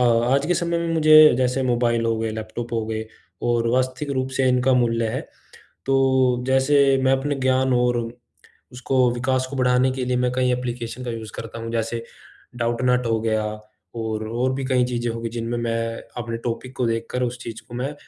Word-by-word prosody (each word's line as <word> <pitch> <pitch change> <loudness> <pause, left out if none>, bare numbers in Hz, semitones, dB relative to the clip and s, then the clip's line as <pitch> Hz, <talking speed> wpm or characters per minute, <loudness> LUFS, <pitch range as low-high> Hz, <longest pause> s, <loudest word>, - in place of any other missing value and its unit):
आज 125 +3 +3
के 180 - +2
समय 170 -1 0
में 170 0 -2
मुझे 155 -3 +7
जैसे 130 +1 +1
मोबाइल 120 -2 +1
हो 115 0 +1
गए, 110 0 -2
लैपटॉप 110 +2 -6
हो 115 -1 0
गए, 110 0 -3 0.4
और 120 -1 +1
वास्तविक 130 +3 -1
रूप 130 0 -1
से 135 - +2
इनका 125 +1 +3
मूल्य 115 -2 +1
है, - - -2 0.7
तो 130 -2 +2
जैसे 135 +1 +4
मैं 130 - +3
अपने 135 +2 0
ज्ञान 130 0 +1
और 125 0 +2 0.8
उसको 125 0 +1
विकास 130 +1 0
को 140 - -5
बढ़ाने 125 0 +3
के 130 -1 -3
लिए, 125 0 0
मैं 125 0 +1
कई 125 0 +1
एप्लिकेशन 125 0 -4
का 120 - -3
यूज़ 110 -3 -7
करता 115 0 -7
हूँ, 115 0 -5
जैसे 115 0 -2 0.5
डाउटनॉट 125 +1 +1
हो 115 -1 +1
गया 110 -1 0 0.6
और 110 -1 -3
और 125 +3 0
भी 135 0 -3
कई 130 -1 +2
चीज़ें 120 -1 -2
हो 115 - -6
गई, 115 - -3
जिनमें 115 +1 -3
मैं 115 -1 -2 0.2
अपने 115 0 -4
टॉपिक 125 +2 -4
को 125 - 0
देखकर 115 +2 -2
उस 125 0 -2
चीज़ 115 -2 -7
को 120 - -10
मैं 135 +4 -3
125 Hz, 195 wpm, -22 LUFS, 115-130 Hz, 0.8 s, मुझे